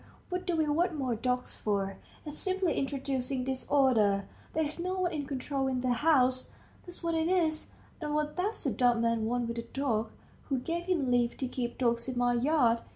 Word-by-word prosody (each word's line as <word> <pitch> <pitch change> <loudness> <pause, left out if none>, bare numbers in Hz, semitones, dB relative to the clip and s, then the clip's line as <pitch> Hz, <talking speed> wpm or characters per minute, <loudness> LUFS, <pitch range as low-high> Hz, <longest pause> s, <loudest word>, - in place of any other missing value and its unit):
what 360 0 -3
do 350 - +1
we 315 -1 +2
want 330 +3 +1
more 260 -4 0
dogs 250 +2 -1
for? 195 -2 -1 0.3
It's 300 -1 -5
simply 375 -2 +1
introducing 270 -1 -1
disorder. 255 -6 +2 0.3
There's 315 0 0
no 365 +2 -1
one 355 -2 0
in 290 -3 -3
control 270 0 -2
in 255 -1 0
the 250 -1 +2
house 255 -2 +3 0.4
that's 355 0 -6
what 335 0 0
it 320 0 +1
is. 330 -4 +1 0.3
And 300 -1 -2
what 300 0 -1
does 400 +5 0
the - - +1
dumb 245 -3 +3
man 230 -1 +1
want 240 +1 0
with 235 0 -3
a - - -1
dog? 230 -3 -1 0.4
Who 270 - +1
gave 335 +7 -3
him 320 -9 +1
leave 240 -1 +2
to 260 - -2
keep 245 -1 -3
dogs 235 -1 +1
in 255 -2 -3
my 245 0 +3
yard? 240 -2 +3
265 Hz, 200 wpm, -30 LUFS, 245-315 Hz, 0.4 s, house